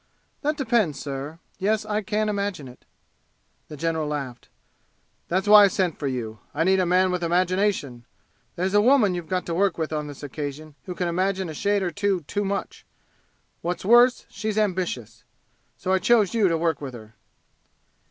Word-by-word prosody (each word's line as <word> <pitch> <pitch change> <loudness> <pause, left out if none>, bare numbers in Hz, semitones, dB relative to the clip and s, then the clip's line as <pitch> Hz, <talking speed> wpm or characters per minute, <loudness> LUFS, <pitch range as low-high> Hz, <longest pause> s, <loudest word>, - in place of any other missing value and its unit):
"That 300 +1 -1
depends, 220 - +1
sir. 140 +3 -6 0.2
Yes, 210 +2 0
I 215 0 -1
can 215 +1 -1
imagine 200 -8 -2
it." 125 - -15 0.8
The 150 - -9
general 160 0 -1
laughed. 135 -5 -5 0.8
"That's 190 +4 -1
why 210 0 +9
I - - +5
sent 185 -4 -1
for 145 - -2
you. 115 -5 -4 0.2
I 160 - +2
need 190 +2 +3
a 185 - +1
man 185 +1 +3
with 180 -1 -2
imagination! 175 - 0 0.5
There's 185 +2 -1
a 205 - +5
woman 235 -5 +4
you've 175 -2 -5
got 185 -1 -1
to 170 - -3
work 190 +1 +1
with 160 -1 -3
on 150 -1 -2
this 145 0 -10
occasion 145 +2 -6
who 180 - -6
can 180 - -1
imagine 185 +1 -1
a - - -5
shade 200 +5 0
or 175 - -1
two 200 -2 0
too 205 +7 -3
much. 200 0 -4 0.8
What's 175 +2 -3
worse, 240 +4 +5
she's 215 +1 -4
ambitious. 175 - -2 0.5
So 185 - -1
I 190 - +3
chose 215 +1 +3
you 220 -4 +3
to 165 -2 +1
work 165 -1 0
with 135 -3 -6
her." 110 -1 -12
180 Hz, 180 wpm, -24 LUFS, 150-205 Hz, 0.8 s, why